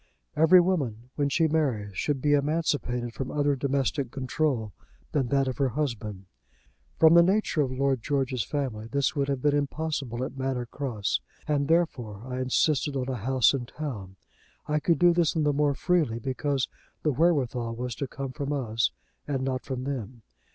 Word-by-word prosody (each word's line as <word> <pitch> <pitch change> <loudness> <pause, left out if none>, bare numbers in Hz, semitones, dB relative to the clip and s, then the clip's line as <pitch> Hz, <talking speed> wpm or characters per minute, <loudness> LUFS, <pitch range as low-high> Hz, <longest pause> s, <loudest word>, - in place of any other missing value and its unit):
Every 160 +4 +7
woman, 130 - -1
when 145 -1 0
she 160 +3 +3
marries, 125 -11 0
should 140 +3 -1
be 145 -1 +4
emancipated 140 -5 0
from 130 +1 -4
other 145 -1 +1
domestic 135 0 0
control 130 - -1 0.4
than 135 -4 +1
that 135 +1 +2
of 130 -2 -3
her 135 -2 +3
husband. 110 -8 -3 0.7
From 160 0 +7
the 170 - +9
nature 190 -3 +2
of 135 -3 0
Lord 135 -1 0
George's 135 -3 0
family 120 -4 -3
this 140 +4 0
would 140 -1 0
have 135 -2 -2
been 145 -1 +3
impossible 145 -4 -2
at 130 - -5
Manor 130 -2 -2
Cross, 115 - -2 0.3
and 145 -2 +1
therefore 125 - 0
I 130 0 -4
insisted 140 +3 +1
on 130 -1 -2
a 130 - -1
house 130 +3 +3
in 125 -3 -3
town. 110 -12 -6 0.5
I 150 0 +1
could 165 +2 +2
do 175 -1 +5
this 170 -2 +2
the 150 -3 +2
more 145 0 +2
freely 155 -9 +1
because 130 +1 -1 0.4
the 150 - +3
wherewithal 130 -6 +1
was 125 +1 -3
to 140 - -2
come 135 +1 -5
from 140 +1 -4
us, 115 -5 0 0.4
and 135 -3 -1
not 130 -1 -1
from 130 -2 -5
them. 125 -4 -5
135 Hz, 175 wpm, -27 LUFS, 125-150 Hz, 0.7 s, the